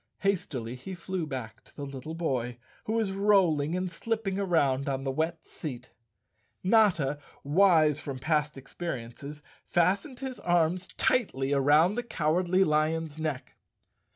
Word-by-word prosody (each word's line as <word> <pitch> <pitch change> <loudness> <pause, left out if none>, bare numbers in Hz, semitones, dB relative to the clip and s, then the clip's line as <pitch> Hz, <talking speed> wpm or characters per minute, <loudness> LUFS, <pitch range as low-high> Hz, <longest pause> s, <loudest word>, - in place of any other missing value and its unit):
Hastily 165 - -1
he 130 +10 -7
flew 175 -1 -4
back 125 -6 -6
to - - -23
the 145 - -5
little 140 +3 -7
boy, 125 -8 -2 0.3
who 220 - -2
was 225 -4 +1
rolling 185 -6 +3
and 185 -1 -2
slipping 215 -2 -2
around 140 -8 +1
on 135 0 -2
the 135 - -1
wet 160 +3 -2
seat. 130 -5 -7 0.7
Notta, 185 -9 +3 0.2
wise 155 -2 +4
from 140 -4 -5
past 150 +1 0
experiences, 140 0 -7 0.2
fastened 195 - +1
his 265 -2 -5
arms 175 +1 +1
tightly 145 - +1
around 150 +6 +4
the 245 - -1
Cowardly 180 -2 +1
Lion's 155 -1 0
neck. 155 -5 -4
160 Hz, 135 wpm, -29 LUFS, 140-185 Hz, 0.7 s, wise